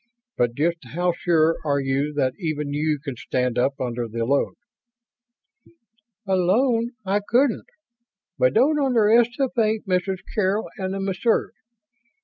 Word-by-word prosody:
"But 120 -1 0
just 170 +5 +1 0.2
how 175 0 +1
sure 165 -1 +2
are 140 -2 +1
you 135 +2 -1
that 130 -3 +1
even 150 -5 -3
you 150 +1 0
can 140 -2 -6
stand 125 0 -1
up 135 +2 0
under 120 -1 -3
the 115 +1 -3
load?" 140 +3 0 1.7
"Alone, 225 +6 +2
I 195 +2 +1
couldn't. 240 +4 +1 0.7
But - - +3
don't 300 +3 +4
underestimate 235 -1 +2
Mrs. 185 0 -1
Carroll 205 0 0
and 190 0 -3
the - - -3
Messrs. 195 +4 0
180 Hz, 125 wpm, -23 LUFS, 140-220 Hz, 1.7 s, don't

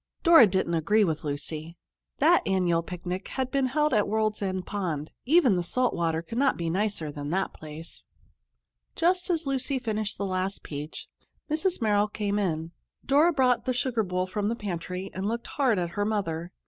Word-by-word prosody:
Dora 330 - +8
didn't 190 -3 0
agree 205 +7 +3
with 160 -5 -1
Lucy. 155 +3 -4 0.4
That 330 +5 +5
annual 180 -3 +2
picnic 180 +2 -5
had 260 -1 -3
been 275 -2 +2
held 300 +2 +1
at 210 -2 +3
World's 215 0 0
End 185 -2 -2
Pond. 165 -7 -3
Even 275 - +5
the - - +1
salt 250 +8 +1
water 165 -1 -1
could 230 +8 -4
not 275 -1 +3
be 165 -1 -2
nicer 190 -5 -1
than 145 0 -6
that 190 +4 -1
place. 155 +1 -9 0.9
Just 360 +2 +1
as 335 -3 0
Lucy 270 0 -1
finished 215 -4 -2
the 200 - -2
last 190 +1 -2
peach, 150 +1 -7 0.4
Mrs. 335 -2 0
Merrill 210 -1 +3
came 205 -1 -2
in. 165 -4 -1 0.3
Dora 295 +5 +4
brought 255 -5 +2
the 255 - +1
sugar 245 -2 0
bowl 185 -2 -1
from 205 +2 -2
the 230 - -1
pantry 185 -2 -5
and 190 +2 -3
looked 235 +2 -2
hard 260 -7 +1
at 175 -1 -1
her 205 +4 -1
mother. 180 -5 -2
205 Hz, 185 wpm, -27 LUFS, 170-250 Hz, 0.9 s, Dora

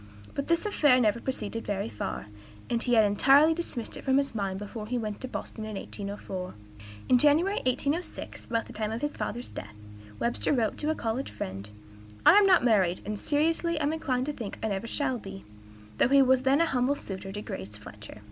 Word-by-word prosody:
But 280 - -3
this 335 +2 +1
affair 295 -11 +4
never 225 -1 +2
proceeded 230 -3 -4
very 200 - -1
far, 105 -2 -5 0.5
and 235 -1 +1
he 245 -1 +3
had 220 -2 +6
entirely 275 +10 +5
dismissed 315 -8 -4
it - - -8
from 265 0 +3
his 280 -2 0
mind 195 -3 -2
before 210 +2 -7
he 250 +2 -1
went 215 -3 -4
to 260 - -3
Boston 225 -3 -6
in 215 -1 -5
1804." 195 -2 -6 0.5
In 250 - +5
January, 315 +9 +4
1806, 285 +7 -2
about 230 -1 -1
the - - -11
time 215 0 -2
of 225 +2 -4
his 295 0 -2
father's 240 +1 -4
death, 105 +2 -8 0.4
Webster 115 -2 0
wrote 230 -5 0
to 300 - -1
a 315 - +1
college 235 +2 -2
friend, 95 +2 -6 0.6
"I - - +9
am 410 0 +6
not 365 -9 +5
married, 190 -6 +3
and 210 0 -4
seriously 325 +2 +1
am 300 +1 0
inclined 255 -5 -1
to 295 - -3
think 225 -7 -6
I 220 - 0
never 200 +3 -3
shall 260 -1 -1
be," 100 - -9 0.5
though - - +5
he 275 0 +6
was 260 0 +4
then 270 +4 +3
a - - +5
humble 265 -2 +1
suitor 195 -6 -7
to 205 - -5
Grace 100 +2 -7
Fletcher. 105 0 -11
240 Hz, 205 wpm, -28 LUFS, 205-285 Hz, 0.6 s, I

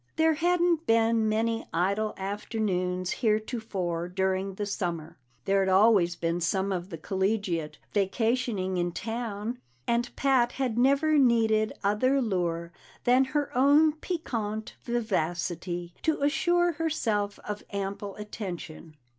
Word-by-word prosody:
There 320 0 +4
hadn't 345 0 +1
been 225 -1 +3
many 225 +1 0
idle 200 +5 0
afternoons 190 -2 -2
heretofore 215 -7 -1
during 190 +1 -1
the 205 - -3
summer; 170 -7 -4 0.3
there'd 195 -1 +2
always 190 -3 +4
been 170 +1 -1
some 190 +3 0
of 180 0 -3
the 165 - -6
collegiate 190 -3 -1 0.2
vacationing 205 -1 0
in 175 0 -1
town, 225 +1 -4 0.3
and 235 +1 +1
Pat 255 -3 +2
had 260 -4 -1
never 280 +5 +3
needed 225 -4 +3
other 255 +7 +2
lure 175 -7 -1 0.3
than 255 +2 +4
her 285 +1 -2
own 290 +4 +5
piquant 230 - -4
vivacity 175 -6 -2
to 315 -3 0
assure 350 +4 +2
herself 230 -11 -1
of 210 0 -4
ample 200 0 -4
attention. 180 -7 -7
215 Hz, 120 wpm, -28 LUFS, 185-245 Hz, 0.3 s, own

